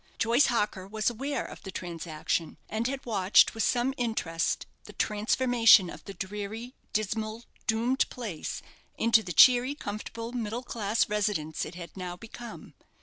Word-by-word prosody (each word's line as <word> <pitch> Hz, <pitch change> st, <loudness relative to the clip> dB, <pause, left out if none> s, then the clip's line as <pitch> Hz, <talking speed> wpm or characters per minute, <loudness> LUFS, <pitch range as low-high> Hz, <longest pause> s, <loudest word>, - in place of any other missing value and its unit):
Joyce 235 Hz, +5 st, +4 dB
Harker 210 Hz, -5 st, -1 dB
was 215 Hz, +3 st, 0 dB
aware 275 Hz, +5 st, -3 dB
of -, -, -10 dB
the 195 Hz, -, -8 dB
transaction, 165 Hz, -2 st, -3 dB
and 220 Hz, +2 st, -1 dB
had 270 Hz, +1 st, -4 dB
watched 200 Hz, -4 st, +4 dB
with 225 Hz, -, -3 dB
some 250 Hz, +3 st, +2 dB
interest 220 Hz, -9 st, -1 dB, 0.2 s
the -, -, -11 dB
transformation 225 Hz, -2 st, +4 dB
of -, -, -11 dB
the 195 Hz, -, -8 dB
dreary, 210 Hz, +6 st, -5 dB, 0.2 s
dismal, 215 Hz, +2 st, -2 dB, 0.2 s
doomed 235 Hz, +4 st, +1 dB
place, 215 Hz, -10 st, -5 dB, 0.3 s
into 230 Hz, 0 st, +4 dB
the 185 Hz, -, -6 dB
cheery, 250 Hz, -, +6 dB
comfortable, 230 Hz, -1 st, -6 dB
middle 235 Hz, 0 st, -3 dB
class 220 Hz, -2 st, 0 dB
residence 205 Hz, -7 st, -1 dB
it 170 Hz, -, -9 dB
had 170 Hz, -2 st, -9 dB
now 180 Hz, -2 st, -5 dB
become. 230 Hz, +3 st, -10 dB
220 Hz, 145 wpm, -29 LUFS, 190-240 Hz, 0.3 s, cheery